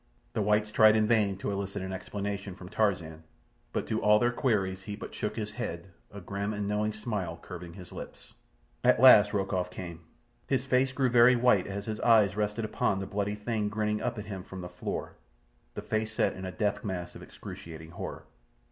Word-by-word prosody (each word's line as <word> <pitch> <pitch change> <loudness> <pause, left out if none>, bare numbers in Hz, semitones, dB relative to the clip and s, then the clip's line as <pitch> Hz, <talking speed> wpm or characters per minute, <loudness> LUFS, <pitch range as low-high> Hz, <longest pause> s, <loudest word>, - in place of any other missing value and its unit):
The - - 0
whites 105 +1 +2
tried 110 0 +6
in 110 -1 +3
vain 105 -4 +2
to 100 - -3
elicit 100 0 -3
an 95 0 -4
explanation 100 0 -4
from 90 -1 -10
Tarzan; 90 -8 0 0.5
but - - -2
to 110 - -1
all 105 0 +6
their 120 +2 +2
queries 100 -7 0
he 105 0 -6
but - - -8
shook 105 - -3
his 105 -2 -4
head, 95 -6 -5 0.2
a 100 - -8
grim 100 +2 -3
and 100 -1 -2
knowing 105 +1 0
smile 105 -6 -4
curving 90 -2 -9
his 90 -2 -11
lips. - - -10 0.5
At - - +5
last 110 -5 +8
Rokoff 95 -3 -1
came. 85 -2 -7 0.5
His 130 -1 0
face 130 0 +2
grew 130 -1 +1
very 120 +1 +7
white 120 -6 +3
as 100 +1 -4
his 110 -1 -4
eyes 110 -5 +5
rested 105 +1 -1
upon 110 -1 0
the 95 - -3
bloody 100 +1 -2
thing 105 0 -2
grinning 105 0 -1
up 120 -1 -2
at 105 - -5
him 100 -3 -6
from 95 0 -8
the 90 - -6
floor, 90 - -5 0.6
the - - -5
face 110 0 -1
set - - +1
in 95 - -7
a 95 - -4
death 105 +1 -1
mask 90 -4 -4
of - - -11
excruciating 80 -1 -10
horror. - - -6
105 Hz, 200 wpm, -29 LUFS, 95-110 Hz, 0.6 s, last